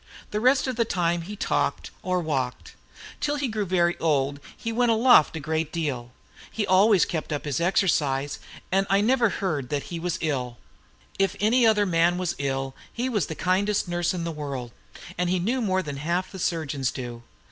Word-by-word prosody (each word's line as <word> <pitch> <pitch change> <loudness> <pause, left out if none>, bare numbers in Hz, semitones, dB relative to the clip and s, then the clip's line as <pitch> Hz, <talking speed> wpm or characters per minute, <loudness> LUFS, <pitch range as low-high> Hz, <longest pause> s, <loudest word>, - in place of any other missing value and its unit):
The 210 - -1
rest 255 +4 +4
of 255 -3 -3
the 235 - +4
time 175 -5 0
he 200 +5 -7
talked - - -1
or 185 -1 0
walked. 135 -6 -3 0.5
Till 290 0 0
he 285 -2 -1
grew 215 -3 -2
very 175 -1 +2
old, 145 -3 +1 0.2
he 230 - -4
went 240 +1 +2
aloft 225 - +5
a - - -3
great 160 +1 -2
deal. 135 -8 -3 0.4
He 215 - -1
always 195 +1 +5
kept 160 -2 -4
up 145 0 -3
his 145 +1 -1
exercise; 145 -7 +1 0.3
and 195 +1 +2
I 195 - +4
never 235 +1 +3
heard 155 -11 -2
that 145 +4 -3
he 170 - -3
was 175 +1 -2
ill. 125 -6 -2 0.6
If 195 0 +2
any 230 +3 +4
other 210 -2 +4
man 170 -1 +2
was 180 -2 -1
ill, 135 -1 -2 0.2
he 245 +2 -2
was 210 - 0
the 160 - -5
kindest 195 +5 +1
nurse 175 -1 0
in 180 -2 -3
the 170 - -2
world; 140 -6 -5 0.5
and 180 -1 +1
he 185 - +2
knew 235 +9 0
more 190 -4 +1
than 145 -3 -5
half 170 +6 -1
the 190 - -8
surgeons 145 -6 -1
do. 120 -2 -6
175 Hz, 195 wpm, -25 LUFS, 145-205 Hz, 0.6 s, aloft